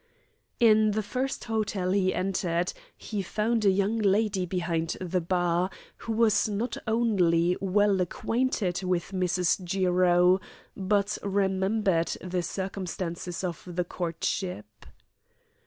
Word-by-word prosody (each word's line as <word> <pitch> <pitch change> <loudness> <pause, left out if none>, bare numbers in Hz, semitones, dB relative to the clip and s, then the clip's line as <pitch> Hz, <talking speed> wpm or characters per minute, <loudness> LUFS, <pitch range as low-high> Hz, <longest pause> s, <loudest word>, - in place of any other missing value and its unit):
In 215 -2 +5
the 215 +1 -1
first 260 +5 -3
hotel 210 -5 -1
he 190 -1 +2
entered 180 -2 -1 0.2
he 210 -3 -4
found 220 +4 0
a 200 - +5
young 200 +4 +1
lady 200 -2 +1
behind 170 -2 -2
the 180 0 -1
bar 175 +1 +1 0.3
who 230 - -4
was 215 -2 +3
not 220 +4 -2
only 180 -7 +2
well 195 0 +2
acquainted 195 -1 -1
with 180 -1 -1
Mrs. 180 0 +1
Jiro, 180 0 +3 0.3
but 200 +1 0
remembered 195 -2 +1
the 180 0 -2
circumstances 180 -2 -4
of 175 -3 -3
the 180 0 -2
courtship. 165 - -4
190 Hz, 115 wpm, -27 LUFS, 180-210 Hz, 0.3 s, In